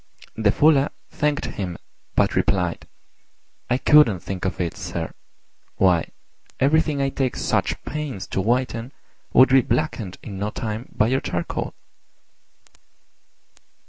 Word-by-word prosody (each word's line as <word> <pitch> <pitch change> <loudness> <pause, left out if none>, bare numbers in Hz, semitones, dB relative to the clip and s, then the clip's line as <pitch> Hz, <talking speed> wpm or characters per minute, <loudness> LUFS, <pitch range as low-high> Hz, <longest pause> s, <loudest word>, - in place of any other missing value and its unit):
The 110 -2 +3
Fuller 145 +2 +4 0.2
thanked 150 -1 0
him, 90 -4 -4 0.4
but - - +2
replied, 90 -3 0 0.8
"I 125 - +3
couldn't 130 - +5
think 95 0 -5
of 95 - -2
it, 85 -2 -2
sir: 85 -4 -5 0.6
why, 90 -3 +3 0.5
everything 150 +1 +2
I 135 0 +1
take 135 -2 -1
such - - 0
pains 145 -11 -4
to 95 - -1
whiten 120 +2 -1 0.4
would 130 - +7
be 135 0 +6
blackened 120 -6 -2
in 100 -3 -7
no 105 +1 -1
time 110 +2 -5
by 105 - +2
your 130 +4 +1
charcoal." 85 -1 -3
115 Hz, 125 wpm, -23 LUFS, 95-135 Hz, 0.8 s, would